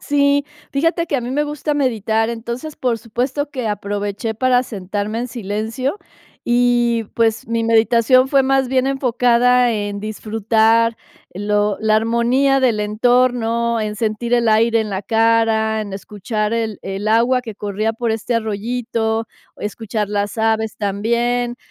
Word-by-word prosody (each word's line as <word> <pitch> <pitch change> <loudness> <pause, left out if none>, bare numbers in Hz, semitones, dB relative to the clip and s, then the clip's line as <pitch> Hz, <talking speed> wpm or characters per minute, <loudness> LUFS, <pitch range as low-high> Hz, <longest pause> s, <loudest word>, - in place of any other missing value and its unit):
Sí, 285 0 +2 0.3
fíjate 330 +4 +1
que 285 - 0
a - - -1
mí 240 +1 -5
me 295 +3 +1
gusta 295 0 -3
meditar, 225 -5 0
entonces, 235 +6 -5
por 240 -3 -1
supuesto 255 +6 -3
que 255 -5 -4
aproveché 205 +1 -3
para 250 +2 +2
sentarme 205 0 -4
en 245 - -2
silencio 230 - -3 0.5
y, 240 -1 +2
pues, 225 -1 0
mi 230 0 0
meditación 230 +3 +4
fue 275 -1 +4
más 270 -1 +2
bien 260 0 +1
enfocada 250 -2 +3
en 205 -1 -3
disfrutar 225 +2 +1 0.4
lo 205 +1 0
la 215 0 +3
armonía 240 +5 +2
del 240 -5 +2
entorno, 235 +1 +1
en 210 0 -3
sentir 225 +2 -2
el 235 -2 +2
aire 225 +1 +3
en 215 -1 -3
la 190 +1 -3
cara, 225 -1 +2
en 205 -2 -6
escuchar 210 +2 -3
el 225 -2 -2
el 195 +2 -4
agua 240 +3 +3
que 220 -4 -7
corría 210 +2 -2
por 230 0 -2
este 225 +2 -2
arroyito, 225 +1 -2 0.3
escuchar 210 0 -4
las 205 +1 -2
aves 220 0 0
también. 235 +4 -1
230 Hz, 145 wpm, -19 LUFS, 215-245 Hz, 0.5 s, meditación